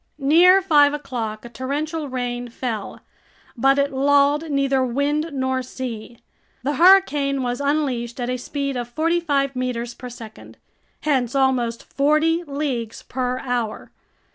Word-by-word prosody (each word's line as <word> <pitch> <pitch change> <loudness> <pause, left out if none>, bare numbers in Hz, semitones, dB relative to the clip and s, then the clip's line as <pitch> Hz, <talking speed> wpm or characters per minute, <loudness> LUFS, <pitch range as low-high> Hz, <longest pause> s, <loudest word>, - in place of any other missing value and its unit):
Near 345 +7 +5
five 295 -5 +4
o'clock 240 -7 -5
a - - -8
torrential 290 +5 -3
rain 245 -1 -3
fell, 230 -4 -5 0.5
but 270 +3 +3
it 280 0 +1
lulled 285 +3 +3
neither 275 -2 +1
wind 285 +5 0
nor 260 -1 -1
sea. 240 -2 -7 0.5
The 285 +3 0
hurricane 295 -7 +4
was 245 +1 -2
unleashed 270 -5 -1
at 240 - -2
a 250 0 -1
speed 275 +2 -4
of 240 -1 -3
forty 330 +7 +1
five 275 -5 0
meters 245 -2 -3
per 250 - -9
second, 225 -2 -12 0.4
hence 265 -4 0
almost 255 -4 +1
forty 310 +4 +1
leagues 275 -7 -4
per 250 0 -2
hour. 240 -4 -3
270 Hz, 140 wpm, -22 LUFS, 245-290 Hz, 0.5 s, Near